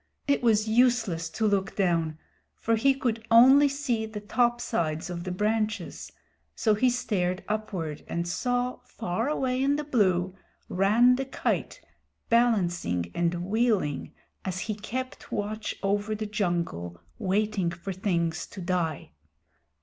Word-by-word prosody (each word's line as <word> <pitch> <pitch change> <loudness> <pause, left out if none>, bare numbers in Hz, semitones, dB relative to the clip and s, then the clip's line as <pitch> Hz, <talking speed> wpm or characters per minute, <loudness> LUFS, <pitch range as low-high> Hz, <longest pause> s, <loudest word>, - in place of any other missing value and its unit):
It 280 - +2
was 220 -2 +3
useless 220 -8 +2
to 220 - -2
look 200 -1 +1
down, 165 -5 +1 0.4
for 230 - 0
he 270 +5 +3
could 230 -4 -2
only 265 +5 +7
see 260 -6 -1
the 215 -1 -6
topsides 210 -8 0
of 170 0 -5
the 185 - -3
branches, 215 +3 -2 0.4
so 220 - +2
he 250 +5 +3
stared 190 -7 -1
upward 190 -8 -3
and 170 0 -2
saw, 245 +6 -1
far 225 +4 -3
away 260 -3 0
in 280 +1 +3
the 300 - -2
blue, 190 -10 +1 0.4
Rann 225 +7 +4
the 270 - -2
Kite 265 - -2 0.5
balancing 175 - +1
and 175 +1 -1
wheeling 210 - 0 0.3
as 185 -1 -3
he 220 - -2
kept 250 +5 -6
watch 215 +1 -3
over 205 +2 0
the 215 0 -4
jungle 170 - -2 0.2
waiting 200 -2 0
for 170 +3 -6
things 170 -4 -1
to 200 - -10
die. 170 -4 -2
210 Hz, 135 wpm, -27 LUFS, 175-235 Hz, 0.5 s, only